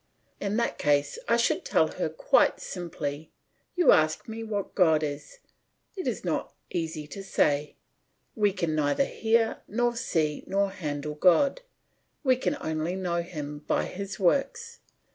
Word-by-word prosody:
In 205 +2 -1
that 235 - -1
case 145 - +1
I - - +4
should - - +1
tell - - +2
her - - -2
quite - - +3
simply, 160 -4 -5 0.5
"You 355 -1 +6
ask 155 0 +3
me 225 0 -5
what 205 -3 -3
God 160 -5 +4
is; 145 - -5 0.6
it 370 - -4
is - - -2
not - - -2 0.2
easy 160 -3 -3
to 195 +6 -8
say; 150 -6 +1 0.6
we 210 -2 +3
can 170 -4 -2
neither 150 - +2
hear 225 -2 +1
nor 240 +3 0
see 155 -10 -1
nor 200 0 +1
handle 150 -5 -4
God; 185 - +4 0.6
we 260 -3 +4
can 270 +3 -1
only 160 +3 -2
know 175 -2 -1
Him 150 -4 -6
by - - +1
His 200 +1 -6
works. 465 - 0
180 Hz, 150 wpm, -27 LUFS, 155-225 Hz, 0.6 s, You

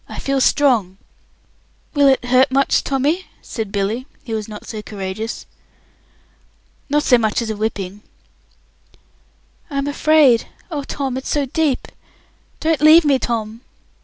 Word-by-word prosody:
"I - - -8
feel 275 -1 -1
strong." 235 -11 +2 1.0
"Will 285 -1 +4
it 265 -2 +3
hurt 255 +2 +4
much, 275 +1 +2
Tommy?" 290 +7 0 0.2
said 220 -5 -5
Billy, 215 +6 -2 0.2
who 230 - -5
was 215 -1 -3
not 210 -1 -9
so 215 -2 -6
courageous. 205 +2 -6 1.4
"Not 295 +1 +2
so 245 -2 +4
much 220 -2 0
as 230 -2 -2
a - - -4
whipping." 205 -2 -4 1.7
"I'm 275 -1 -2
afraid! 285 -4 +3 0.2
Oh, 290 -3 -3
Tom, 270 -2 -3
it's 265 - -6
so 290 -2 +1
deep! 285 -1 -1 0.7
Don't 320 -1 0
leave 310 +2 +7
me, 275 -3 +3
Tom!" 225 -1 -3
255 Hz, 135 wpm, -19 LUFS, 220-285 Hz, 1.7 s, leave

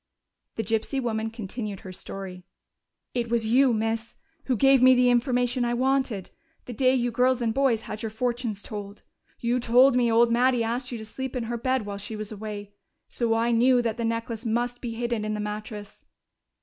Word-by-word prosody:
The 225 - -2
gypsy 225 +6 -1
woman 225 -3 -1
continued 215 -2 -6
her 185 - -9
story: 185 -1 -7 0.7
"It 240 -2 -1
was 235 -1 +1
you, 255 +4 +4
miss, 225 +1 -2 0.3
who 255 - +1
gave 270 +1 +5
me 255 0 +7
the 250 0 +4
information 245 0 +1
I 240 0 0
wanted, 260 -6 0 0.3
the 245 - -7
day 255 +3 +3
you 245 -1 0
girls 250 +2 +2
and 230 -2 0
boys 260 -4 +2
had 215 0 -6
your 225 - -3
fortunes 235 -2 -2
told. 205 -1 -7 0.4
You 240 +1 0
told 245 +2 +5
me 240 -2 +3
old 230 +1 +4
Mattie 245 0 +3
asked 245 +3 -2
you 240 - -4
to 220 - -8
sleep 265 +4 -6
in 250 - -1
her 235 +1 -3
bed 255 -1 0
while 200 -1 -5
she 205 +2 -6
was 215 0 -6
away. 205 -1 -7 0.4
So 230 -2 0
I 230 +1 +1
knew 245 +2 +4
that 230 -1 -1
the 235 - -2
necklace 230 0 -2
must 240 +1 -1
be 230 -2 -4
hidden 235 -2 -2
in 215 0 -2
the - - -4
mattress.... 210 0 -6
235 Hz, 200 wpm, -26 LUFS, 220-250 Hz, 0.7 s, me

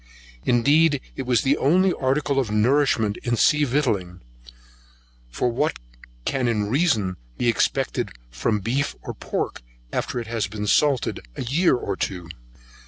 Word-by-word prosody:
Indeed 145 +5 +4 0.2
it 130 -2 -5
is 120 -3 +3
the 140 +1 +2
only 180 +6 +3
article 135 +1 0
of 125 -5 -1
nourishment 110 -1 +2
in 120 -1 -1
sea 150 +5 +4
victualling; 105 -10 -1 1.1
for 120 - -1
what 150 +7 0 0.5
can 130 -2 0
in 105 -3 0
reason 120 - +1 0.2
be 120 - 0
expected 115 - 0 0.2
from 100 - -1
beef 130 +7 -1
or - - -5
pork - - -4 0.3
after 130 -2 -2
it 120 - -5
has 115 -2 -2
been 105 +1 -5
salted 140 +3 +2 0.2
a - - -4
year 145 +6 +3
or 100 -5 -3
two? 90 -2 -4
125 Hz, 145 wpm, -23 LUFS, 105-145 Hz, 1.1 s, Indeed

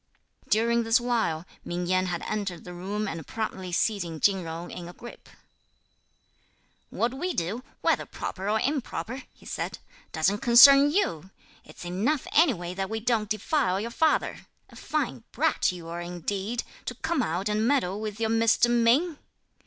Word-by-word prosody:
During 235 +2 +3
this 225 +2 +3
while, 225 -10 -1 0.2
Ming 175 +1 -3
Yen 185 +1 +1
had 175 -1 -3
entered 200 -5 -3
the 180 - -9
room 200 +4 -3
and 165 -4 -6
promptly 190 -5 -4
seizing 175 -4 -1
Chin 195 +1 +3
Jung 165 +1 -6
in 175 -1 -7
a - - -10
grip: 240 +6 -12 1.6
"What 235 +1 -1
we 355 +7 -3
do, 190 +9 -2 0.2
whether - - +1
proper 195 +1 -5
or 220 +1 +2
improper," 260 -1 -2
he - - -21
said, - - -4 0.3
"doesn't 185 +6 +1
concern 275 +4 +8
you! 190 - 0 0.3
It's - - -12
enough 215 - 0
anyway 210 - +3
that 190 +1 -3
we 220 0 -2
don't 220 -2 0
defile 215 - 0
your 230 +3 -4
father! 315 +5 0 0.2
A - - -15
fine - - -3
brat - - +1
you 175 -2 -9
are 170 +1 -5
indeed, 190 +6 -3 0.2
to 250 - -4
come 320 +3 -1
out 185 -1 -1
and 210 +2 +1
meddle 215 -8 +1
with 215 0 -5
your 225 -1 0
Mr. 230 +1 +3
Ming!" 250 +8 +3
215 Hz, 160 wpm, -27 LUFS, 180-240 Hz, 1.6 s, concern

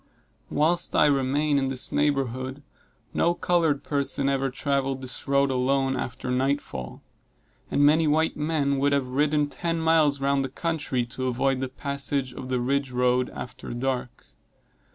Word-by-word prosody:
Whilst 165 +4 +1
I - - +5
remained 145 +1 +2
in 135 - 0
this 130 -1 -1
neighborhood, 135 -1 -1 0.5
no 170 +1 +2
colored 165 -5 +1
person 140 -1 -1
ever 135 0 0
traveled 135 0 -1
this 130 +2 -3
road 140 0 +3
alone 135 +1 +1
after 125 0 -4
night 135 +3 +1
fall; 65 - -8 0.7
and 145 - +3
many 155 +2 +4
white 160 +2 +2
men 150 -2 0
would 140 +1 +2
have 135 -2 0
ridden 145 +2 +1
ten 165 +2 -2
miles 160 -3 +3
round 140 0 +1
the 135 - -3
country 145 -4 -2
to 130 +2 -4
avoid 130 +1 +1
the 130 -1 -3
passage 140 -1 -1
of 130 0 -8
the 130 -1 0
ridge 135 +2 0
road, 125 0 +1
after 125 - -8
dark. 125 0 -3
140 Hz, 155 wpm, -26 LUFS, 130-145 Hz, 0.7 s, I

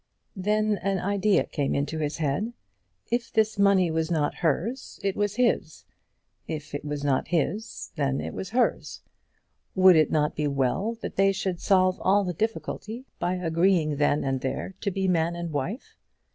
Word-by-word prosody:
Then 210 +2 +1
an 195 0 0
idea 200 +2 +2
came 140 -3 -1
into 145 +3 -2
his 150 -1 -2
head. 165 +10 -1 0.6
If 240 0 -1
this 220 -2 +1
money 195 -4 +4
was 160 0 -1
not 155 -4 +1
hers, 180 - -2
it 195 -1 0
was 205 0 -1
his. 235 -10 0 0.6
If 155 -2 -6
it 145 - -4
was 145 -1 -4
not 140 -2 +1
his, 195 +6 -2
then 140 -2 0
it - - -5
was 190 - -5
hers. 245 +2 0 0.7
Would 185 -1 +7
it 155 -2 +4
not 150 -1 +1
be 150 0 0
well 140 - 0
that - - -5
they 195 0 +5
should 190 -2 -3
solve 185 -2 +3
all 200 +2 +3
the 180 -2 -2
difficulty 220 +4 -4
by 180 +1 0
agreeing 165 -3 +1
then 145 0 +2
and 135 -1 -1
there 135 +8 -3
to 205 - 0
be 190 0 -1
man 170 -1 +1
and 170 -1 -4
wife? 155 - -4
180 Hz, 170 wpm, -26 LUFS, 150-200 Hz, 0.7 s, Would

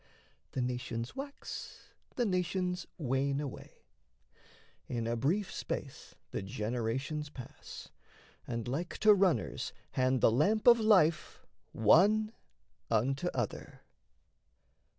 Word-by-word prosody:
The 130 - 0
nations 125 -1 -3
wax, 280 +1 -8 0.2
the 245 - +1
nations 180 -2 -1
wane 140 -1 0
away; 145 -3 -8 1.0
In 115 -2 -2
a 115 +1 0
brief 170 - 0
space - - -5 0.2
the - - -3
generations 120 +9 -3
pass, 130 -5 -10 0.6
And 115 -1 -3
like 155 +8 -3
to 215 -1 +8
runners 190 -4 +1 0.2
hand 130 -1 +1
the - - +6
lamp 200 - +2
of 235 -1 +8
life 190 -8 +3 0.3
One 205 - +4 0.6
unto 135 +8 +1
other. 120 -5 -4
140 Hz, 105 wpm, -32 LUFS, 120-185 Hz, 1.0 s, to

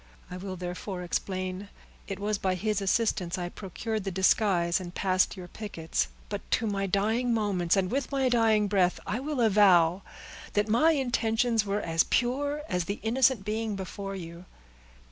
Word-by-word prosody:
I 180 - -5
will 190 0 -6
therefore 180 +1 -5
explain, 185 +1 -3
that 200 - -9 0.5
it 190 - -8
was 205 0 -1
by 185 -1 0
his 210 +2 -1
assistance 195 -3 0
I 175 -1 -3
procured 210 +3 -4
the 195 - -2
disguise, 190 -2 +2
and 175 -1 -8
passed 185 0 +1
your 180 -1 -8
pickets; 170 -6 -3 0.2
but 205 -1 -4
to 225 - +2
my 195 -2 -1
dying 220 +5 +1
moments, 195 -4 +1
and 190 0 0
with 275 +2 -1
my 270 -2 +1
dying 225 -4 +3
breath, 190 -3 +2
I 205 +4 -2
will 290 0 -3
avow, 190 -5 +5 0.5
that 205 +1 +1
my 250 +10 +4
intentions 235 -4 +1
were 200 +1 0
as 165 -2 +2
pure 285 +5 0
as 180 -1 -1
the 200 +3 -4
innocent 240 -2 +2
being 215 0 -2
before 195 +1 -6
you." 170 -1 -8
200 Hz, 170 wpm, -28 LUFS, 185-225 Hz, 0.5 s, avow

